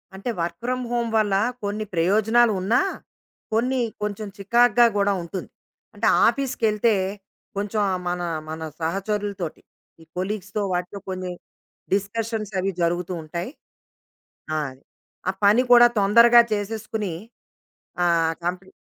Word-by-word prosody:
అంటే 195 +6 -5
work 170 0 -3
from 255 0 -1
home 235 -1 0
వల్ల 210 -2 +2 0.3
కొన్ని 210 +1 -2
ప్రయోజనాలు 215 +7 +3
ఉన్నా 230 +8 +3 0.7
కొన్ని 250 +4 +1 0.2
కొంచెం 210 0 -3
చికాగ్గా 240 +4 +4
గూడా 200 0 +2
ఉంటుంది. 180 +2 -6 0.5
అంటే - - 0 0.2
ఆఫీస్‌కెళ్తే 230 -5 +1 0.6
కొంచెం 205 +2 -2
ఆ - - 0
మన 175 0 -1 0.3
మన 160 +1 -6 0.2
సహచరులతోటి 195 0 -3 0.4
ఈ - - -14
కొలీగ్స్‌తో 200 +2 -3
వాటితో 180 +3 -3
కొన్ని 185 -1 -4 0.6
డిస్కషన్స్ 215 +1 -2
అవి 195 +1 0
జరుగుతూ 175 +2 0
ఉంటాయి. 170 +8 -5 1.0
ఆ! - - +1 0.7
ఆ - - +3
పని 215 +5 +6
కూడా 240 0 +9
తొందరగా 235 +4 +7
చేసేసుకొని 210 -1 -3 0.9
ఆహ్, 165 -2 +3
కంపెనీ 185 +2 -3
205 Hz, 115 wpm, -23 LUFS, 185-225 Hz, 1.0 s, కూడా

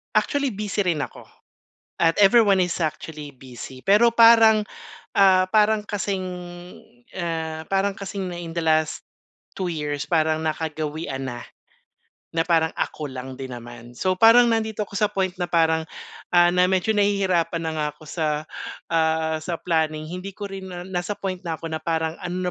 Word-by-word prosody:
Actually 280 -4 +1
busy 205 0 -2
rin 165 -5 +1
ako, - - -7 0.7
at 165 -1 +3
everyone 200 -3 +5
is 175 -1 -1
actually 155 -2 -4
busy, 130 0 -10
pero 225 +4 +4
parang 225 -2 +7 0.6
ah, 185 -1 +5
parang 215 0 +3
kasing, 200 -2 -3 1.0
ah, 160 -2 -3
parang 195 +1 0
kasing 195 -1 -5
na 175 - -6
in 165 -1 -7
the 170 - -1
last 155 -1 +1 0.6
2 190 - -1
years 150 -3 -3
parang 160 -1 +1
nakagawian 155 -3 -3
na, 120 -2 -6 0.9
na 165 0 +1
parang 165 -2 +3
ako 150 -3 -3
lang 130 0 -7
din 130 -1 -7
naman. 120 0 -11
So 185 0 +1
parang 230 +4 +7
nandito 220 -2 -1
ako - - -11
sa 210 +1 +1
point 190 -2 0
na 175 -1 -3
parang, 160 -1 +3 0.5
ah, 175 -1 +6
na 180 0 +3
medyo 190 +3 +2
nahihirapan 190 -5 +1
na - - -1
nga 155 -1 -1
ako - - -17
sa, 155 +1 -2 0.6
ah, 160 -1 +1
sa 170 -1 -4
planning. 155 -2 -1
Hindi 180 +4 -6
ko 205 - -5
rin 195 -1 -8
na 175 0 -6
nasa 185 +2 -3
point 185 -2 -3
na 165 -2 -4
ako 165 - -5
na 160 - -2
parang, 160 -1 -1
ano 180 0 -3
175 Hz, 165 wpm, -23 LUFS, 160-195 Hz, 1.0 s, parang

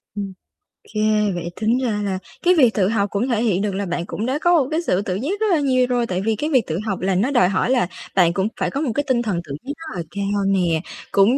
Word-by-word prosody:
Ừm. 200 -2 -4 0.6
Kê, 215 -1 +2
vậy 170 0 -4
tính 225 +3 +2
ra 210 -4 0
là 190 -2 -2 0.2
cái 360 +1 +5
việc 245 -6 +5
tự 190 -3 +2
học 205 -3 +1
cũng 205 +6 -1
thể 230 -1 +1
hiện 200 -5 +1
được 205 -2 -1
là 200 0 -2
bạn 175 -1 -3
cũng 210 - -4
đã 265 +4 -1
có 350 0 +4
một - - -5
cái 325 +2 +1
sự 195 - +1
tự 185 -2 -2
giác 315 - -2
rất 440 - +1
là 325 - +4
nhiều 255 -3 +2
rồi. 245 -1 +1
Tại 185 0 -2
vì 220 +1 +1
cái 300 +8 -2
việc 260 -6 +2
tự 160 +1 -2
học 195 -3 -2
là 190 0 +1
nó 235 +9 +1
đòi 185 -9 +4
hỏi 195 +4 0
là 245 -9 +2 0.3
bạn 175 -3 +4
cũng 190 +2 0
phải 185 - 0
có 280 - -2
một 275 - 0
cái 290 - +1
tinh 245 -2 +2
thần 200 -7 -1
tự 140 -3 -6
giác 285 - -3
rất 325 - -8
là 170 - -2
cao 200 0 -1
nè, 175 -5 +2 0.3
cũng 205 +7 +4
210 Hz, 285 wpm, -21 LUFS, 190-255 Hz, 0.6 s, cái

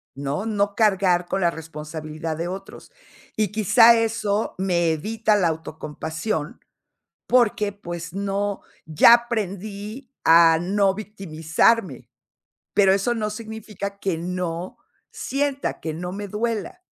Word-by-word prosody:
No, 140 +7 -3
no 205 -2 0
cargar 190 -5 +3
con 195 - -1
la 170 -1 +3
responsabilidad 155 0 -6
de 170 +1 -3
otros. 195 - -9 0.5
Y 215 -3 +1
quizá 225 +2 +6
eso 215 -2 -1
me 175 -3 +1
evita 215 +7 0
la 185 -4 +2
autocompasión 160 +1 -4 0.7
porque 220 -4 +2
pues 175 -4 -7
no 200 +1 -2 0.2
ya 155 +9 +7
aprendí 215 +1 -3
a 165 0 +7
no 195 +2 +1
victimizarme. 190 - 0 0.7
Pero 195 -1 +5
eso 200 +5 0
no 215 -2 -2
significa 215 -2 -7
que 190 -4 -1
no 180 0 -4 0.3
sienta, 280 0 -2
que 160 - -4
no 180 +2 -5
me 205 +1 -5
duela. 225 - -3
195 Hz, 120 wpm, -23 LUFS, 165-215 Hz, 0.7 s, ya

